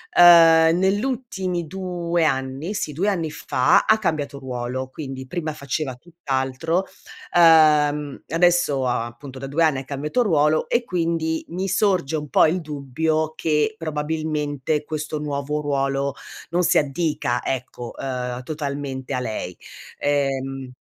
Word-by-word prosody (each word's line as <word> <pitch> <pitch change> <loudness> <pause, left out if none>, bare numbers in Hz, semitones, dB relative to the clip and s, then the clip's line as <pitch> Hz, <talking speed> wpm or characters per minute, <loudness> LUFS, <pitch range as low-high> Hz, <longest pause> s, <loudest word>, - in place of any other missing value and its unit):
ehm, 165 -1 +7
nell'ultimi 195 -3 -1
2 175 -1 -2
anni 135 +7 -2
sì, 150 - -3
2 195 +8 0
anni 165 -6 -1
fa 130 -4 +2
ha 220 - +5
cambiato 155 -8 -2
ruolo, 130 0 -4
quindi 130 -2 -7
prima 160 +1 -3
faceva 140 -2 -3
tutt'altro, 160 +2 -2 0.5
ehm, 150 -3 +5
adesso 165 -5 +2
appunto 125 +2 -4
da 135 - -6
2 160 +4 +1
anni 145 -4 +2
ha - - -6
cambiato 150 - -1
ruolo, 155 -6 +2
e 240 0 +2
quindi 165 -4 -1
mi 185 +3 -3
sorge 185 -7 +1
un 150 -1 -6
po' - - +5
il 175 +3 +1
dubbio 155 +2 -2
che, 155 +7 +1
probabilmente, 150 -2 -2
questo 155 0 -4
nuovo 150 0 -3
ruolo 140 -1 -1 0.4
non 175 +1 +2
si 175 - +3
addica, 145 -4 0
ecco, 125 -2 -5
ehm, 125 -1 -4
totalmente 140 -3 -4
a - - 0
lei. 110 -7 -4 0.4
Ehm 135 -2 -1
150 Hz, 130 wpm, -22 LUFS, 135-165 Hz, 0.5 s, ehm